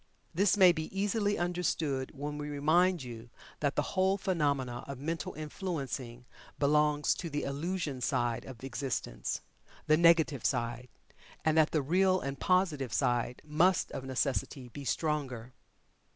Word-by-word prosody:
This 195 Hz, +4 st, +3 dB
may 185 Hz, -3 st, +8 dB
be 160 Hz, -2 st, -3 dB
easily 205 Hz, 0 st, +1 dB
understood, 165 Hz, -6 st, -1 dB
when 145 Hz, +1 st, -4 dB
we 150 Hz, 0 st, -4 dB
remind 160 Hz, +4 st, +2 dB
you 120 Hz, -1 st, -9 dB, 0.3 s
that 145 Hz, -1 st, 0 dB
the -, -, +2 dB
whole 190 Hz, +1 st, +3 dB
phenomena 140 Hz, -10 st, -1 dB
of 140 Hz, -1 st, -6 dB
mental 160 Hz, +3 st, -4 dB
influencing 140 Hz, -7 st, -5 dB, 0.3 s
belongs 150 Hz, 0 st, +3 dB
to 170 Hz, -, -5 dB
the 145 Hz, -1 st, -2 dB
"illusion" 145 Hz, -1 st, -3 dB
side 120 Hz, -3 st, 0 dB
of 130 Hz, -2 st, -11 dB
existence 130 Hz, -, -3 dB, 0.4 s
the 155 Hz, -, +4 dB
negative 165 Hz, -5 st, +4 dB
side 120 Hz, -1 st, -1 dB, 0.6 s
and 160 Hz, -1 st, +3 dB
that 160 Hz, -1 st, +5 dB
the 155 Hz, -3 st, 0 dB
Real 185 Hz, +5 st, +3 dB
and 135 Hz, -3 st, -5 dB
Positive 170 Hz, -9 st, +1 dB
side 120 Hz, 0 st, 0 dB
must 165 Hz, +4 st, +2 dB
of 130 Hz, -, -5 dB
necessity 130 Hz, 0 st, -2 dB
be 140 Hz, +3 st, -8 dB
stronger. 130 Hz, -6 st, -2 dB
150 Hz, 140 wpm, -31 LUFS, 130-170 Hz, 0.6 s, may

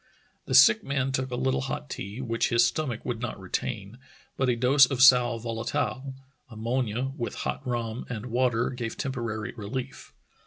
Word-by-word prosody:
The 130 Hz, -, 0 dB
sick 115 Hz, -4 st, +7 dB
man 135 Hz, -1 st, -1 dB
took 130 Hz, 0 st, -1 dB
a 125 Hz, -, -2 dB
Httle 130 Hz, 0 st, 0 dB
hot 95 Hz, -, -4 dB
tea, 100 Hz, -, -6 dB
which 115 Hz, -2 st, 0 dB
his 120 Hz, 0 st, +4 dB
stomach 120 Hz, -2 st, -2 dB
would 115 Hz, -2 st, -3 dB
not 120 Hz, -4 st, -4 dB
retain, 105 Hz, +3 st, -4 dB, 0.4 s
but 130 Hz, -1 st, +1 dB
a 125 Hz, -, +2 dB
dose 130 Hz, +3 st, +5 dB
of 135 Hz, -2 st, -3 dB
sal 125 Hz, -2 st, +6 dB
volatile 120 Hz, +4 st, -3 dB, 0.3 s
(ammonia) 120 Hz, +2 st, -2 dB
with 120 Hz, -4 st, -4 dB
hot -, -, -2 dB
rum 120 Hz, -1 st, -3 dB
and 115 Hz, -3 st, -5 dB
water 120 Hz, -1 st, +1 dB
gave 120 Hz, -3 st, -5 dB
temporary 120 Hz, -5 st, -3 dB
relief. 125 Hz, +5 st, -6 dB
120 Hz, 165 wpm, -27 LUFS, 115-130 Hz, 0.4 s, sick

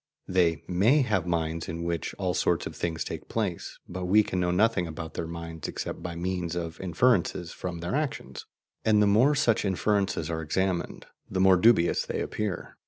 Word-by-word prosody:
They 90 Hz, -3 st, +2 dB
MAY 110 Hz, +11 st, +4 dB
have 95 Hz, -8 st, 0 dB
minds 80 Hz, -1 st, -1 dB
in 85 Hz, 0 st, -4 dB
which 85 Hz, -1 st, -3 dB
all 95 Hz, -2 st, -1 dB
sorts -, -, +1 dB
of -, -, -6 dB
things 85 Hz, -1 st, -2 dB
take -, -, -7 dB
place, 100 Hz, -7 st, -3 dB
but 90 Hz, +1 st, -5 dB
we 105 Hz, +4 st, +5 dB
can 95 Hz, -, -3 dB
know 90 Hz, 0 st, +1 dB
nothing 90 Hz, 0 st, +2 dB
about 80 Hz, 0 st, -7 dB
their 80 Hz, -, -4 dB
minds 85 Hz, -1 st, -6 dB
except -, -, -5 dB
by 85 Hz, -1 st, -5 dB
means 90 Hz, -1 st, -2 dB
of 85 Hz, -1 st, -4 dB
inferences 90 Hz, -2 st, +1 dB
from 85 Hz, -2 st, -5 dB
their 85 Hz, -, -3 dB
actions; 150 Hz, -1 st, -3 dB, 0.4 s
and 110 Hz, -1 st, +4 dB
the 105 Hz, -, +5 dB
more 115 Hz, +9 st, +4 dB
such 120 Hz, -6 st, +2 dB
inferences 100 Hz, 0 st, 0 dB
are 80 Hz, -1 st, -3 dB
examined, 90 Hz, +3 st, -1 dB, 0.2 s
the 95 Hz, -, -2 dB
more 95 Hz, 0 st, +6 dB
dubious 90 Hz, -2 st, +4 dB
they -, -, -3 dB
appear. 105 Hz, -5 st, -4 dB
90 Hz, 185 wpm, -27 LUFS, 85-105 Hz, 0.4 s, more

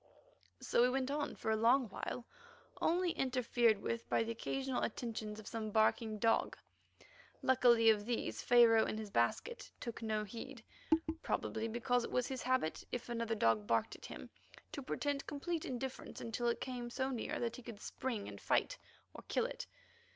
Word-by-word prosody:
So -, -, +2 dB
we 250 Hz, -, +6 dB
went 265 Hz, +1 st, 0 dB
on 295 Hz, 0 st, -2 dB
for 220 Hz, -, -2 dB
a -, -, +3 dB
long 240 Hz, +3 st, +4 dB
while, 235 Hz, +4 st, -5 dB, 0.6 s
only 350 Hz, +1 st, +2 dB
interfered 245 Hz, -5 st, +2 dB
with 230 Hz, 0 st, -3 dB
by -, -, +3 dB
the 225 Hz, -, -3 dB
occasional 265 Hz, +3 st, -2 dB
attentions 220 Hz, -2 st, -3 dB
of 215 Hz, -, -10 dB
some 220 Hz, -1 st, -3 dB
barking 220 Hz, +1 st, +2 dB
dog. 225 Hz, +1 st, +2 dB, 0.9 s
Luckily 245 Hz, -3 st, +5 dB
of 210 Hz, 0 st, -1 dB
these 240 Hz, -1 st, -1 dB
Pharaoh, 235 Hz, -2 st, +6 dB
in -, -, -2 dB
his 215 Hz, -2 st, -6 dB
basket, 155 Hz, -, 0 dB
took 235 Hz, -2 st, -5 dB
no 215 Hz, -1 st, 0 dB
heed, 235 Hz, +4 st, -8 dB, 0.6 s
probably 220 Hz, 0 st, -1 dB
because 240 Hz, +2 st, +1 dB
it -, -, -4 dB
was 250 Hz, -, +1 dB
his 260 Hz, 0 st, -4 dB
habit 255 Hz, -11 st, 0 dB
if 245 Hz, 0 st, -4 dB
another 230 Hz, -1 st, -1 dB
dog 115 Hz, -, +2 dB
barked 115 Hz, -1 st, +1 dB
at -, -, -10 dB
him -, -, -9 dB, 0.4 s
to 285 Hz, -, -5 dB
pretend 280 Hz, +1 st, -2 dB
complete 320 Hz, +2 st, -3 dB
indifference 260 Hz, +1 st, -5 dB
until 235 Hz, +1 st, -2 dB
it 235 Hz, -, +1 dB
came 245 Hz, -2 st, -4 dB
so 260 Hz, +2 st, -1 dB
near 245 Hz, -, -3 dB
that 235 Hz, 0 st, -2 dB
he -, -, -9 dB
could 230 Hz, -3 st, -9 dB
spring 230 Hz, -3 st, -4 dB
and -, -, -8 dB
fight, -, -, +1 dB, 0.3 s
or -, -, -10 dB
kill -, -, +1 dB
it. -, -, -5 dB
235 Hz, 175 wpm, -36 LUFS, 220-260 Hz, 0.9 s, we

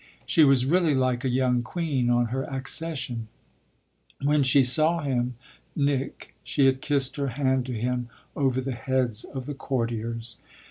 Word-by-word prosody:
She 160 Hz, -, +4 dB
was 135 Hz, -3 st, +5 dB
really 165 Hz, 0 st, +3 dB
like 130 Hz, -1 st, 0 dB
a 130 Hz, -, 0 dB
young 125 Hz, -1 st, +2 dB
queen 135 Hz, -3 st, -1 dB
on 120 Hz, -1 st, +2 dB
her 135 Hz, +1 st, -2 dB
accession. 135 Hz, -4 st, -3 dB, 0.9 s
When 145 Hz, +1 st, +2 dB
she 135 Hz, +1 st, +5 dB
saw 155 Hz, +6 st, +3 dB
him, 125 Hz, -3 st, -1 dB, 0.4 s
Nick, 140 Hz, -2 st, -2 dB
she 140 Hz, -, +1 dB
had 135 Hz, 0 st, +2 dB
kissed 140 Hz, -1 st, 0 dB
her 140 Hz, -1 st, -1 dB
hand 130 Hz, 0 st, 0 dB
to 125 Hz, -, -4 dB
him 125 Hz, +1 st, -2 dB, 0.3 s
over 130 Hz, -2 st, +1 dB
the 135 Hz, +1 st, -3 dB
heads 125 Hz, -3 st, 0 dB
of 130 Hz, -3 st, -7 dB
the 145 Hz, -, -4 dB
courtiers. 115 Hz, -3 st, -3 dB
130 Hz, 155 wpm, -26 LUFS, 125-140 Hz, 0.9 s, was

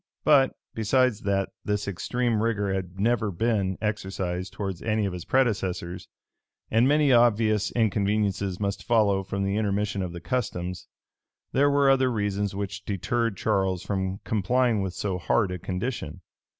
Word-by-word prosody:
But, 140 Hz, -3 st, +4 dB, 0.2 s
besides 115 Hz, +1 st, +2 dB
that 100 Hz, -1 st, 0 dB
this 105 Hz, 0 st, -1 dB
extreme 115 Hz, +5 st, -1 dB
rigor 105 Hz, -4 st, 0 dB
had 95 Hz, -1 st, -4 dB
never 115 Hz, 0 st, +1 dB
been 100 Hz, -1 st, 0 dB
exercised 95 Hz, -4 st, -3 dB
towards 95 Hz, -4 st, -4 dB
any 110 Hz, -1 st, 0 dB
of 95 Hz, -, -2 dB
his 90 Hz, -2 st, -6 dB
predecessors, 95 Hz, -8 st, 0 dB, 0.6 s
and 115 Hz, +3 st, +4 dB
many 145 Hz, -1 st, +4 dB
obvious 110 Hz, -3 st, +3 dB
inconveniencies 100 Hz, -3 st, 0 dB
must 100 Hz, -1 st, -2 dB
follow 105 Hz, -4 st, +3 dB
from 100 Hz, +1 st, -3 dB
the 100 Hz, +1 st, 0 dB
intermission 100 Hz, -1 st, 0 dB
of 90 Hz, -2 st, -3 dB
the 85 Hz, -, -7 dB
customs, 90 Hz, -5 st, -3 dB, 0.6 s
there 145 Hz, +2 st, +3 dB
were 140 Hz, -1 st, +3 dB
other 130 Hz, -1 st, +3 dB
reasons 100 Hz, -2 st, -1 dB
which 100 Hz, 0 st, -4 dB
deterred 115 Hz, +2 st, -1 dB
Charles 95 Hz, -2 st, 0 dB
from 95 Hz, -1 st, -2 dB
complying 115 Hz, +2 st, +1 dB
with 95 Hz, -2 st, -3 dB
so 95 Hz, -3 st, -2 dB
hard 95 Hz, +2 st, +1 dB
a 90 Hz, -, -4 dB
condition. 90 Hz, -, -4 dB
100 Hz, 150 wpm, -26 LUFS, 95-115 Hz, 0.6 s, But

